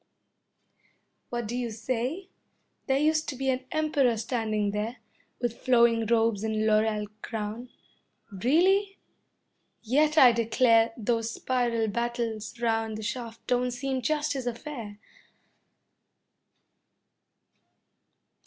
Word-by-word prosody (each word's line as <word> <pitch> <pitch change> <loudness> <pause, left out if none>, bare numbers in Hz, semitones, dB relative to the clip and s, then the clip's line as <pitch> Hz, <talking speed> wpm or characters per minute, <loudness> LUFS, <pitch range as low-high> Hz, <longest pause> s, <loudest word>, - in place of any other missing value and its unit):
What 240 -1 -3
do 235 - -4
you 245 -1 -2
say? 255 - -3 0.6
There 265 -1 +2
used 310 +2 +1
to 280 - -4
be 265 +1 0
an 255 0 -3
Emperor 290 -6 +2
standing 215 -3 -1
there, 215 +4 -3 0.4
With 240 -2 -2
flowing 235 -3 +3
robes 225 -2 +2
and 220 0 0
laurel 215 -1 +2 0.2
crown. 225 +2 -5 0.6
Really? 365 - +2 0.9
Yet 295 +7 +2
I 255 -5 +9
declare 230 0 +3
Those 230 0 -1
spiral 235 -3 0
battles 235 0 -3
round 225 -2 0
the 220 - -7
shaft 230 +1 -5
don't 250 0 +1
seem 265 +1 -3
just 300 +4 0
his 265 -3 -4
affair. 235 -4 -6
235 Hz, 105 wpm, -27 LUFS, 225-260 Hz, 0.9 s, I